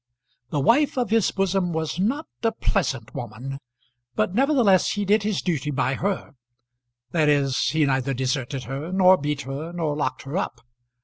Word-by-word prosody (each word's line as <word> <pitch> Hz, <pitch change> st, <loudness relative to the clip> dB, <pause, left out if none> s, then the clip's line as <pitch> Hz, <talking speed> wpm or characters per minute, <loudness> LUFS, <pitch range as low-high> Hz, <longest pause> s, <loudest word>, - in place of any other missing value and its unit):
The 145 Hz, -, -1 dB
wife 260 Hz, -, +3 dB
of 245 Hz, -3 st, 0 dB
his 225 Hz, -4 st, +3 dB
bosom 195 Hz, -2 st, 0 dB
was 160 Hz, +1 st, -2 dB
not 265 Hz, -, 0 dB, 0.2 s
a 225 Hz, -, +2 dB
pleasant 135 Hz, -, -1 dB
woman, 125 Hz, +4 st, -6 dB, 0.6 s
but 110 Hz, +11 st, 0 dB
nevertheless 245 Hz, -6 st, +3 dB
he 205 Hz, -1 st, -2 dB
did 210 Hz, +2 st, +3 dB
his 205 Hz, -2 st, -1 dB
duty 150 Hz, -6 st, -1 dB
by 135 Hz, -1 st, 0 dB
her; 190 Hz, +1 st, -2 dB, 0.8 s
that 155 Hz, -3 st, +2 dB
is, 140 Hz, -2 st, +2 dB
he 155 Hz, 0 st, +2 dB
neither 135 Hz, 0 st, 0 dB
deserted 130 Hz, +1 st, -2 dB
her, 135 Hz, +7 st, -5 dB
nor 185 Hz, 0 st, +6 dB
beat 150 Hz, -3 st, -2 dB
her, 140 Hz, +5 st, -5 dB
nor 165 Hz, -4 st, -2 dB
locked 145 Hz, -3 st, -2 dB
her 135 Hz, +4 st, -6 dB
up. 120 Hz, -11 st, -3 dB
155 Hz, 170 wpm, -24 LUFS, 135-195 Hz, 0.8 s, nor